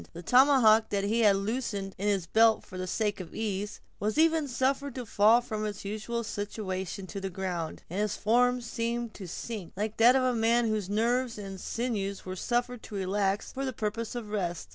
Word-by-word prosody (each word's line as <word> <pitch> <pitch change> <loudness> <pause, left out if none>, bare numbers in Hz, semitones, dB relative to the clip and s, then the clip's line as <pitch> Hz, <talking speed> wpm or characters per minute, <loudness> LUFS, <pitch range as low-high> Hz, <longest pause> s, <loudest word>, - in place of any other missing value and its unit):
The 170 +1 -8
tomahawk 245 - +5
that 200 -1 0
he 215 +4 +1
had 210 -3 +5
loosened 200 -2 -2
in 205 - -1
his 195 -4 +1
belt 225 +4 +4
for 185 - -12
the 185 0 -4
sake 210 +2 -1
of 180 -3 -8
ease, 210 -1 -3 0.2
was 215 +6 -1
even 320 -1 +3
suffered 270 +1 -1
to 250 -2 -5
fall 220 +3 +5
from 215 -3 -4
its 205 -2 -4
usual 215 +3 -3
situation 200 -3 -4
to 195 +1 -6
the 195 - -3
ground, 180 -3 -4
and 185 +4 -4
his 210 -1 0
form 245 +3 +3
seemed 235 0 -3
to 190 - -8
sink, 205 +1 -6
like 210 +1 -2
that 240 +3 +7
of 265 - +3
a 255 -1 +2
man 230 +1 +3
whose 215 -3 -1
nerves 235 +3 +1
and 195 -2 -7
sinews 210 -5 -3
were 185 0 -5
suffered 240 +3 -1
to 210 - -9
relax 195 +1 0
for 270 - -3
the 260 -1 -2
purpose 225 +1 -3
of 225 -4 -5
rest. 175 -5 -3
215 Hz, 205 wpm, -29 LUFS, 195-240 Hz, 0.2 s, that